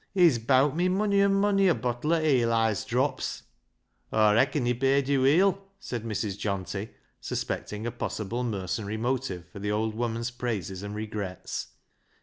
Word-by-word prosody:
He's 170 -10 +5
bowt 130 +5 +3
me 180 +2 +2
mony 200 +1 +2
an' 200 0 +4
mony 195 -1 +3
a 175 - +4
bottle 125 +6 -1
o' 165 - +3
Eli's 115 -8 +2
drops," 130 +3 -1 0.3
" - - -45
Aw 110 -1 +4
reacon 120 +5 +2
he 120 - +2
paid 135 +2 +2
yo' 140 -2 +2
weel," 185 +8 +4 0.2
said 120 - -4
I\Irs. 105 -3 -3
Johnty, 100 +1 -3 0.3
suspecting 105 +2 -4
a 120 - -1
possible 120 0 -3
mercenary 105 -1 -3
motive 115 -7 -2
for 100 - -10
the 105 +1 -3
old 110 +1 0
woman's 115 +1 -2
praises 105 -7 -3
and 100 +1 -6
regrets. 105 -4 -5
120 Hz, 160 wpm, -27 LUFS, 105-140 Hz, 0.3 s, He's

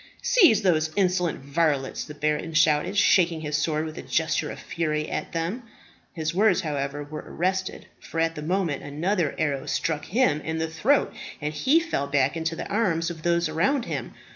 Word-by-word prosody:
"Seize 345 - +5
those 160 -4 +2
insolent 180 -5 +1
varlets!" 140 -2 0
the 150 - -9
baron 150 +2 -1
shouted, 155 +6 +3
shaking 175 -5 +4
his 150 -1 -2
sword 155 0 0
with 155 -1 -7
a - - -5
gesture 160 -1 0
of - - -7
fury 155 -2 -2
at - - -4
them. 170 +9 -2 0.5
His 160 -2 -2
words, 210 +2 +3
however, 145 -2 -3
were 150 +1 -7
arrested, 185 +2 -2
for 165 - -6
at 165 0 +2
the 150 - -7
moment 170 -2 -1
another 160 +3 -1
arrow 145 -4 -1
struck 155 -2 -1
him 190 - +2
in 160 +1 -3
the 160 0 -1
throat, 215 - +1 0.3
and 150 0 -3
he 270 - +3
fell 330 - -2
back 140 +1 +1
into 165 0 -2
the - - -5
arms 175 -6 0
of 160 -2 -9
those 170 0 +1
around 215 - +1
him. - - -5
160 Hz, 185 wpm, -25 LUFS, 150-185 Hz, 0.5 s, Seize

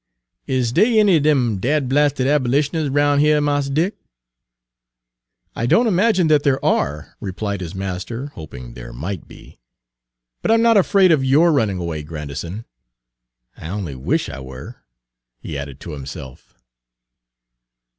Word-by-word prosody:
"Is 130 -3 0
dey 220 - +4
any 200 -5 +5
er - - +2
dem 130 -8 +2
dadblasted 140 +2 +1
abolitioners 145 +2 +1
roun' 145 +1 +2
heah, 150 0 +4
Mars 145 -1 0
Dick?" 165 +9 0 1.6
"I 115 - -1
don't 235 - +4
imagine 195 -2 +3
that 155 -2 +4
there 140 -2 +2
are," 75 +1 0
replied 100 +1 -4
his 90 +1 -6
master, 95 +8 -5
hoping 65 -6 -10
there - - -10
might 85 +8 -5
be. - - -15 0.8
"But - - -2
I 225 - +6
'm 230 - +3
not 230 -1 +5
afraid 195 -2 +4
of 150 -4 +3
yourrunning 135 - +3
away, 85 -3 -4
Grandison. 80 - -6 0.9
I - - -9
only 95 -6 -4
wish 65 0 -1
I - - -7
were," 65 0 -9 0.6
he 75 - -7
added 70 -1 -6
to 85 - -7
himself. 70 -2 -9
130 Hz, 140 wpm, -20 LUFS, -, 1.6 s, I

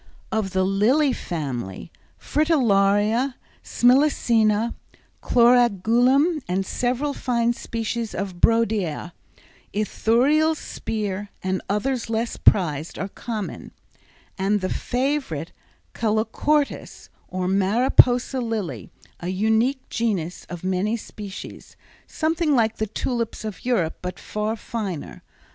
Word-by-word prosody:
Of 215 -3 0
the 190 0 +2
lily 235 +10 +3
family, 130 - -5 0.3
fritillaria, 230 - +2 0.3
smilacina, 235 -4 +3 0.5
chlorogalum 245 - +4
and 185 +2 -1
several 250 +7 -1
fine 235 -3 0
species 230 -1 -4
of 190 -2 -4
brodiæa, 210 -7 +1 0.6
Ithuriel's 270 +9 +2
spear, 205 -5 -4
and 190 0 -1
others 235 +4 -1
less 225 +1 -1
prized 160 -5 +2
are 195 - -3
common, 215 -1 -6 0.7
and 200 +1 +1
the 185 - -1
favorite 250 - -2 0.4
calochortus, 225 +7 -1 0.2
or 185 0 -3
Mariposa 245 +6 +4
lily, 195 - -4 0.3
a 175 - -5
unique 220 +8 +1
genus 195 -8 -2
of 175 -1 -7
many 190 +4 0
species, 205 -3 -9 0.3
something 320 -1 0
like 225 -2 +2
the 220 - -1
tulips 230 +1 -3
of 215 -3 -6
Europe 190 -10 0
but 180 -1 -5
far 215 +1 -3
finer. 205 -8 -5
220 Hz, 100 wpm, -23 LUFS, 190-245 Hz, 0.7 s, chlorogalum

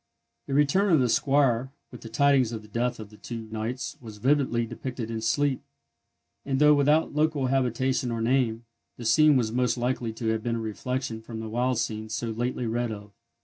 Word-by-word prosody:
The 135 - -2
return 165 +8 +3
of 160 - +5
the 125 - +3
squire 130 0 +2 0.2
with 125 - -11
the 115 - -9
tidings 130 0 +3
of 110 -2 -6
the - - -14
death 120 +3 -2
of 110 -1 -9
the 105 - -15
two 115 -1 -7
knights 115 +2 -4
was 110 -3 -10
vividly 130 -1 +1
depicted 120 -1 -6
in 110 -1 -3
sleep; 135 +4 +1 0.8
and, 135 -1 -1
though 150 +1 +6
without 150 +2 +3
local 150 -2 +1
habitation 130 0 0
or 115 -1 -2
name, 120 -1 +1 0.3
the 120 - -8
scene 150 +5 +5
was 115 -3 0
most 125 +1 +1
likely 120 -1 -1
to 115 0 -3
have 110 0 0
been 115 +1 -1
a - - -2
reflection 115 +2 -4
from 110 0 -8
the 110 0 -5
wild 125 +2 0
scenes 110 -1 -3
so 115 -1 -3
lately 120 +2 -2
read 120 +1 -1
of. 105 -1 -8
120 Hz, 200 wpm, -26 LUFS, 115-135 Hz, 0.8 s, though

